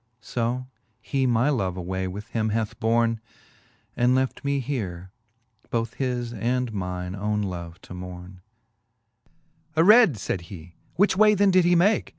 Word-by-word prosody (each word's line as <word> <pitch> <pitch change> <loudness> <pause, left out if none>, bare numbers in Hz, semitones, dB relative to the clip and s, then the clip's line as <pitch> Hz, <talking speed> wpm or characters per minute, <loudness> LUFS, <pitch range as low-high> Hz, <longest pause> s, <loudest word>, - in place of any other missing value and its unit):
So 120 +3 -2 0.3
he 130 +3 -1
my 120 +4 +2
love 95 -9 -1
away 95 +1 -3
with 105 +4 -7
him 110 -2 -1
hath 110 0 -2
borne. 115 0 +1 0.7
And 125 +1 +3
left 130 0 -1
me 140 0 0
here, 95 -9 -4 0.6
both 115 -1 -2
his 125 -3 -2
and 120 +2 -1
mine 90 -2 -4
owne 105 +1 -1
love 85 -2 -6
to - - -11
morne. 90 0 -9 1.3
XIX. - - -25
Aread, 205 - +7
fayd 95 -3 -3
he, 85 -3 -10 0.2
which 200 +1 +3
way 210 +1 +5
then 200 0 +4
did 185 -1 +4
he 175 0 +4
make 195 +5 +3
115 Hz, 155 wpm, -25 LUFS, 95-130 Hz, 1.3 s, Aread